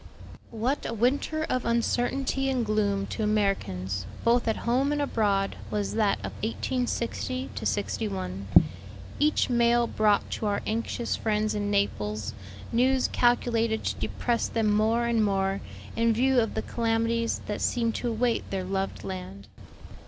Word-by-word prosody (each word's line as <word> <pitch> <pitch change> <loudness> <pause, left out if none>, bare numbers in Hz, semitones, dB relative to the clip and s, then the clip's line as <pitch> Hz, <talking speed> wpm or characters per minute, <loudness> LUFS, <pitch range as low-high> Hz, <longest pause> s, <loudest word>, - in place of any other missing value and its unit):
'" - - -19 0.2
What 275 +3 +1
a 230 - -3
winter 280 +7 +1
of 255 - 0
uncertainty 245 +3 0
and 255 -3 0
gloom 205 -2 +1
to 220 - -5
Americans, 95 - 0 0.2
both 235 +1 +3
at 225 - +2
home 260 +4 +2
and 295 - 0
abroad, 205 -8 +1
was 205 -1 -2
that 215 -3 +2
of - - -4
1860 250 +2 -2
'61. 190 - -2 0.7
Each 300 +1 +3
mail 240 -1 +3
brought 215 -3 +2
to 215 - -2
our 200 0 -1
anxious 230 +2 -1
friends 215 -1 0
in 205 -1 -1
Naples 110 - -1 0.4
news 255 +2 +3
calculated 230 -2 +2
to - - -1
depress 235 -1 -1
them 220 -2 +1
more 220 +3 +2
and 235 -2 +2
more 195 -1 0 0.3
in 230 0 +3
view 260 +3 +3
of 225 -2 0
the - - -1
calamities 230 0 0
that 210 - -4
seemed 230 -2 +1
to 245 - -2
await 235 +1 0
their 190 -1 -2
loved 190 -4 -3
land. 95 +1 -7
225 Hz, 145 wpm, -27 LUFS, 200-240 Hz, 0.7 s, both